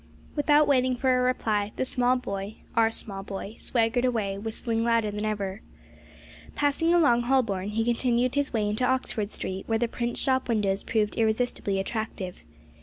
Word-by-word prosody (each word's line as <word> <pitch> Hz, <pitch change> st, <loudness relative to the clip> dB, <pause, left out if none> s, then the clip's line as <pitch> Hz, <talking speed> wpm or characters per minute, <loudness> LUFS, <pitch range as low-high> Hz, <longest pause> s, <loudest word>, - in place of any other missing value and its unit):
Without 295 Hz, 0 st, +4 dB
waiting 255 Hz, -2 st, +3 dB
for 255 Hz, +1 st, +2 dB
a 250 Hz, -, +2 dB
reply, 215 Hz, -5 st, 0 dB
the -, -, -1 dB
small 250 Hz, 0 st, +3 dB
boy 200 Hz, -3 st, -5 dB, 0.2 s
(our 225 Hz, -1 st, +4 dB
small 200 Hz, -3 st, -6 dB
boy) 195 Hz, +1 st, -6 dB
swaggered 235 Hz, 0 st, +1 dB
away 220 Hz, -6 st, 0 dB
whistling 225 Hz, +2 st, -2 dB
louder 230 Hz, -2 st, +2 dB
than 210 Hz, +1 st, -3 dB
ever. 205 Hz, -2 st, -3 dB, 0.9 s
Passing 290 Hz, +3 st, +1 dB
along 290 Hz, -9 st, +4 dB
Holborn, 230 Hz, -7 st, +1 dB
he 225 Hz, +2 st, -1 dB
continued 240 Hz, +1 st, +1 dB
his 285 Hz, 0 st, 0 dB
way 215 Hz, -3 st, 0 dB
into 210 Hz, +4 st, -1 dB
Oxford 250 Hz, -5 st, +1 dB
Street, 190 Hz, -2 st, -5 dB
where 225 Hz, -, +1 dB
the 240 Hz, +1 st, 0 dB
print 240 Hz, +1 st, -3 dB
shop 260 Hz, -2 st, +1 dB
windows 205 Hz, -4 st, +1 dB
proved 215 Hz, -2 st, -1 dB
irresistibly 220 Hz, -3 st, 0 dB
attractive. 195 Hz, -, -4 dB
230 Hz, 165 wpm, -27 LUFS, 210-255 Hz, 0.9 s, Without